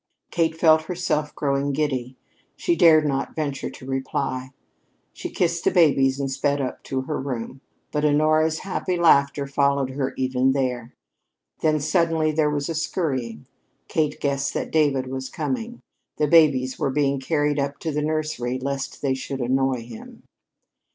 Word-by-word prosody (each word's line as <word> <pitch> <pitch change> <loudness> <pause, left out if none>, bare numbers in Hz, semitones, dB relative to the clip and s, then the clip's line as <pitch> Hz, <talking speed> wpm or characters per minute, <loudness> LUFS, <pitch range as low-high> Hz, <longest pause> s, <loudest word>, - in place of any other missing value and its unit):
Kate 160 -2 0
felt 160 -1 +4
herself 155 -4 -2
growing 140 0 0
giddy. 130 -4 -2 0.4
She 345 - 0
dared 160 - +6
not 135 -2 -2
venture 145 -3 -3
to - - -12
reply. 135 -1 -3 0.6
She - - -6
kissed 170 -1 0
the - - +4
babies 135 -6 +3
and 135 -1 -2
sped 140 +1 0
up 130 -2 -3
to 130 -1 -2
her 145 +2 -3
room. 130 -1 -5 0.3
But 150 0 -1
Honora's 155 +2 +2
happy 185 -1 -2
laughter 140 -4 +4
followed 140 -1 +1
her 135 0 -3
even 130 0 +1
there. 125 -3 -2 0.6
Then 155 -1 +2
suddenly 160 0 +1
there 155 -1 +2
was 145 -1 -2
a 165 - -2
scurrying. 135 - -2 0.4
Kate 155 -2 -1
guessed 140 -1 -1
that - - -3
David 145 -4 +2
was 130 0 -5
coming. 240 -1 -4 0.4
The 150 - +2
babies 140 -5 +4
were - - +1
being 140 0 +1
carried 145 +1 0
up 140 0 -2
to 160 - -2
the 150 0 -1
nursery 155 -5 -2
lest 135 +2 -4
they 135 -2 +2
should 135 +1 -5
annoy 130 0 0
him. 115 -2 -12
140 Hz, 160 wpm, -23 LUFS, 130-155 Hz, 0.6 s, dared